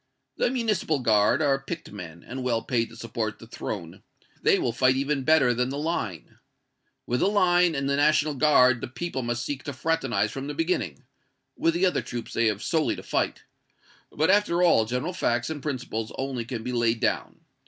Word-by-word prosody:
The - - +2
Municipal 220 - 0
Guard 115 +3 +3
are 135 -2 +2
picked 155 +4 -7
men, 85 -5 -9
and 130 +2 -5
well 120 -3 0
paid 115 -2 0
to - - -13
support 110 -2 -4
the - - -12
Throne 95 -6 -6 0.4
they - - +4
will 120 - 0
fight 130 +1 +3
even 140 +1 0
better 135 -4 +4
than 125 +1 0
the 140 - -4
Line. 130 - -4 0.7
With 125 +1 -1
the - - +3
Line 180 -4 +3
and 135 -1 -1
the 140 0 +1
National 150 +1 +3
Guard 130 -4 +4
the - - -4
people 135 +2 -4
must 120 0 -2
seek 145 -2 -4
to 145 - -4
fraternize 165 +5 0
from 135 +1 -5
the 145 - -5
beginning 160 - -1 0.5
with 165 0 +1
the 180 +2 +3
other 180 - +1
troops 120 -2 -6
they 115 0 +2
have 105 0 -1
solely 160 -2 +1
to - - -9
fight - - -1 0.7
but, 160 +5 +2
after 195 -4 +3
all, 140 -11 +5
general 125 +10 -2
facts 120 -4 0
and 150 -2 -5
principles 120 -6 -4
only 130 -3 -3
can 115 -2 -5
be 125 - -3
laid 120 -1 +1
down. - - -1
130 Hz, 195 wpm, -26 LUFS, 115-155 Hz, 0.7 s, all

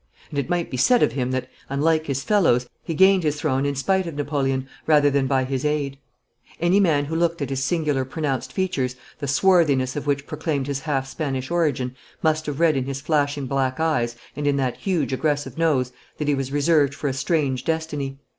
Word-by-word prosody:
And 145 - -1
it 135 - -3
might 175 -1 -1
be 130 - -3
said 240 - +4
of - - +3
him 125 0 -2
that, 130 0 -2 0.2
unlike 155 +3 +1
his 135 -1 -2
fellows, 160 - +3 0.2
he 165 - -4
gained 190 +2 +5
his 150 -2 -1
throne 140 -2 0
in 140 - -1
spite 190 +6 +1
of 165 - -6
Napoleon 135 -2 -1 0.2
rather 145 -2 +5
than 135 -1 +1
by 135 -1 +2
his 130 0 -2
aid. 145 -2 -1 0.6
Any 175 +4 +3
man 155 -7 +3
who 160 +3 -4
looked 170 0 +1
at 140 -2 -3
his 135 0 -1
singular 150 -5 0
pronounced 135 0 -3
features, 140 -10 -1 0.2
the 140 - -3
swarthiness 140 -4 +3
of 145 0 -4
which 140 0 0
proclaimed 145 -5 -2
his 140 -1 -2
half 135 -2 -1
Spanish 135 -1 -3
origin, 140 -7 0 0.3
must 155 -1 +1
have 145 0 -3
read 165 -3 +4
in 130 -1 0
his 135 0 -4
flashing 145 -1 0
black 130 0 -1
eyes 130 -8 +1 0.2
and 145 +1 -2
in 145 - +3
that 130 -3 -1
huge 170 -9 -1
aggressive 145 +1 -1
nose 135 -6 +2 0.3
that 150 - -3
he 145 - +3
was 135 -1 -2
reserved 145 -1 +3
for 145 - -3
a 135 - 0
strange 135 -2 0
destiny. 150 -4 -2
145 Hz, 210 wpm, -23 LUFS, 135-160 Hz, 0.6 s, gained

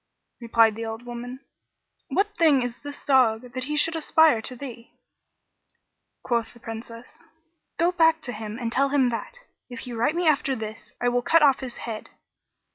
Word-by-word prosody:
Replied 230 -2 +4
the 225 - -5
old 225 +2 -6
woman, 245 +2 -7 0.7
"What 410 +1 0
thing 300 -8 +4
is 245 -1 -5
this 290 0 -8
dog 250 -3 +3
that 255 0 -3
he 300 +2 -2
should 330 +2 +2
aspire 315 -5 +4
to 255 - -4
thee?" 245 -3 -10 1.3
Quoth 235 -1 -1
the - - -15
Princess, 230 +1 -9 0.5
"Go 345 +1 +3
back 325 -2 +4
to 245 - -5
him 215 0 -6
and 235 -2 -3
tell 275 +3 +2
him 270 -3 +3
that, 240 - -5 0.3
if 245 -2 -7
he 250 - -6
write 235 +7 0
me 350 -1 0
after 280 -3 +2
this, 220 -2 -8
I 245 - +2
will 245 0 +1
cut 330 +5 +4
off 275 -3 +5
his 255 -3 -7
head." 225 -2 -6
245 Hz, 180 wpm, -25 LUFS, 230-290 Hz, 1.3 s, off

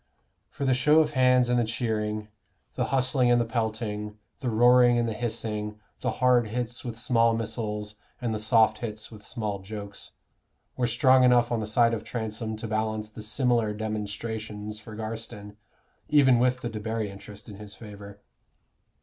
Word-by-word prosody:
For 140 - -4
the 130 - +3
show 150 +5 +4
of 155 -1 +4
hands 125 -2 +4
and 125 0 +2
the - - +3
cheering, 110 -2 -2 0.4
the - - -1
hustling 130 -1 +2
and 120 0 +5
the 120 - +1
pelting, 110 -2 -3 0.2
the 130 - -2
roaring 120 +1 +5
and 120 -1 +1
the 115 - -2
hissing, 105 -2 -4 0.2
the 125 -3 -1
hard 125 -1 +3
hits 120 +2 -4
with 120 -3 -6
small 115 -1 +3
missiles 105 -2 -3 0.2
and 120 -3 -2
the 110 - -2
soft 110 0 +3
hits 110 -1 -5
with 105 -2 -12
small 105 -2 -4
jokes, 100 0 -8 0.7
were 125 -1 0
strong 130 +2 +4
enough 125 -1 +4
on 120 - +1
the 110 - -3
side 115 +2 +3
of 115 - -3
Transome 110 -1 -4
to 110 +1 -6
balance 110 0 -2
the 110 - -9
similar 115 -1 +1
"demonstrations" 105 0 -4
for 110 0 -11
Garstin, 110 -1 -7 0.5
even 135 -5 +5
with 125 +1 +2
the 120 - -3
Debarry 110 -1 -3
interest 100 +2 -11
in 105 -3 -9
his 105 -1 -10
favor. 100 -2 -11
110 Hz, 170 wpm, -27 LUFS, 105-120 Hz, 0.7 s, and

